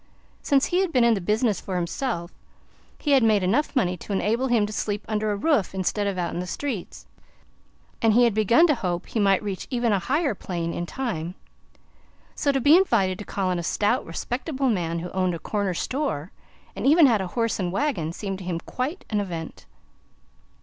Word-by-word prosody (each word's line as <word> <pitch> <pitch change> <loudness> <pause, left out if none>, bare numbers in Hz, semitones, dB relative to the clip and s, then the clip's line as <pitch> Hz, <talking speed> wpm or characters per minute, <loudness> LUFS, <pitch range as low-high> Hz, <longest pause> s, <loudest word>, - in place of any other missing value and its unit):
Since 275 -1 +3
he 355 - +1
had 380 -3 +1
been 250 -5 +3
in 235 -1 +5
business 210 +1 +1
for 190 - -5
himself, 175 0 -2 0.7
he 295 - -2
had 275 -2 +6
made 215 -4 +3
enough 235 +12 +1
money 185 -8 +2
to 190 - -9
enable 225 +6 +1
him 235 -4 +3
to 210 - -6
sleep 210 0 -2
under 215 -1 0
a - - 0
roof 215 - +1
instead 200 +2 -1
of 195 -2 -2
out 175 -1 -2
in - - -3
the 180 - -4
streets, 240 -5 -5 1.0
and 225 -1 +4
he 245 - +6
had 235 -3 +3
begun 220 - +5
to 310 - +4
hope 180 -8 -3
he 225 - -3
might 195 -1 +3
reach 195 -3 -4
even 240 -3 0
a 200 - +2
higher 280 - 0
plane, 170 -3 -4
in 175 - -4
time. 185 -10 -4 1.0
So, 285 - +1
to 270 - 0
be 290 +5 +6
invited 205 - +2
to 210 - -7
call 195 -2 -2
on 180 -1 0
a - - -4
stout, 210 +8 +1
respectable 260 - -2
man 170 -6 -1
who 175 +2 -5
owned 185 -2 0
a - - -4
corner 200 +1 -2
store, 235 - -2 0.4
and - - -1
even 315 +2 +7
had 230 -7 +3
a 190 - -3
horse 230 -2 0
and 180 -2 -1
wagon, 195 - -1
seemed 195 +1 -5
to - - -8
him 175 -2 -3
quite 265 - -4
an 210 - +1
event. 170 -5 -6
210 Hz, 205 wpm, -25 LUFS, 185-255 Hz, 1.0 s, even